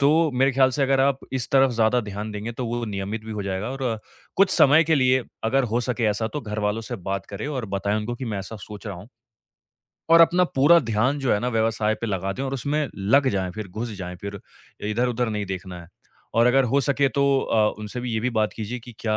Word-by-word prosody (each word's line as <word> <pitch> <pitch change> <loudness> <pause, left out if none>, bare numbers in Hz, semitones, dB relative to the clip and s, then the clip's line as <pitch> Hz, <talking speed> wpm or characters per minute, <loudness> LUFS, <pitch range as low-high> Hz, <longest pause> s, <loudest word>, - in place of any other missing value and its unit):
तो 140 - +5 0.3
मेरे 135 +2 +3
ख़्याल 130 0 +4
से 140 - 0
अगर 135 0 +3
आप 135 0 +2
इस 130 -2 -2
तरफ 135 -1 +5
ज़्यादा 115 +1 +2
ध्यान 105 0 -6
देंगे, 105 +3 -5
तो 120 +1 -4
वो 120 +1 -2
नियमित 105 +1 -4
भी 110 - -6
हो 105 -1 -4
जाएगा 95 +4 -3
और 130 -4 -2 0.4
कुछ 195 0 +4
समय 150 +4 +6
के 160 0 +3
लिए 130 -1 +3 0.2
अगर 135 +4 +2
हो 120 - +2
सके 120 -1 -2
ऐसा 110 +2 -2
तो 150 - -2
घरवालों 105 -2 -2
से 120 +2 -5
बात 95 0 -3
करें 100 +6 -6
और 130 -5 -3
बताएँ 100 +2 0
उनको 110 +3 -3
कि 130 - -6
मैं 105 -3 -3
ऐसा 95 +4 -7
सोच 105 +1 -10
रहा 100 - -5
हूँ 90 +5 -12 1.0
और 165 0 +8
अपना 175 +2 +5
पूरा 150 +6 +7
ध्यान 115 +2 0
जो 135 -3 +1
है - - +2
ना 125 - -1
व्यवसाय 110 -2 +1
पे 115 - -2
लगा 95 -2 -2
दें 130 - -5
और 135 0 -2
उसमें 145 +3 -1
लग 125 +8 +3
जाएँ, 95 -5 -1
फिर 105 +2 -7
घुस 110 +6 -5
जाएँ, 90 -1 -6
फिर 100 +2 -7 0.5
इधर-उधर 120 +2 0
नहीं 105 -2 -2
देखना 95 -1 -6
है। 85 - -13 0.5
और 115 +1 +4
अगर 135 +2 +4
हो 135 +4 +2
सके 140 +1 +2
तो 140 +3 0 0.2
अ, 110 -4 +2
उनसे 105 +3 -6
भी 120 -1 -4
ये 110 - 0
भी 125 +3 0
बात 110 -2 0
कीजिए 115 +3 -5
कि 120 +1 -12
क्या 110 -2 0
115 Hz, 240 wpm, -24 LUFS, 105-130 Hz, 1.0 s, और